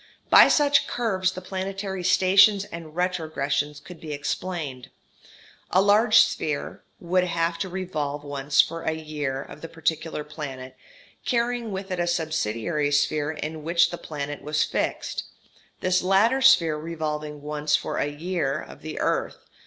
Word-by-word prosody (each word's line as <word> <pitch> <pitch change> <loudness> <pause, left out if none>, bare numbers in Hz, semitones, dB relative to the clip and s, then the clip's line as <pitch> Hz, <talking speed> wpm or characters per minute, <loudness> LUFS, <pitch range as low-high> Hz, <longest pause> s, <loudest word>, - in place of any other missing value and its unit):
By - - +9
such 290 -1 +3
curves 190 -6 0
the 185 - -7
planetary 190 0 -4
stations 190 +2 +5
and 165 -4 -9
retrogressions 155 -5 -1
could 180 +1 -13
be 155 -2 -5
explained. 145 -2 -4 0.8
A 185 - +3
large 215 +3 +5
sphere 150 -2 -2 0.2
would 180 +1 +1
have 170 -1 -1
to 190 - -2
revolve 155 -6 -3
once 145 0 +2
for 165 0 -5
a 160 - -1
"year" 150 -4 -4
of 150 - -12
the 165 - -6
particular 160 -1 -2
planet, 135 -4 -8 0.5
carrying 235 -1 -1
with 190 0 -5
it 180 - -2
a 175 - 0
subsidiary 155 -3 -1
sphere 145 +1 +1
in 155 0 -5
which 170 +2 +3
the 175 - -5
planet 145 -2 -5
was 150 +1 0
fixed; - - -2 0.6
this 185 0 +2
latter 205 +8 +3
sphere 165 -11 +5
revolving 150 -2 -4
once 150 0 0
for - - -2
a - - +1
"year" 155 -1 -2
of - - -11
the 155 - -7
earth. - - -1
165 Hz, 150 wpm, -25 LUFS, 150-185 Hz, 0.8 s, By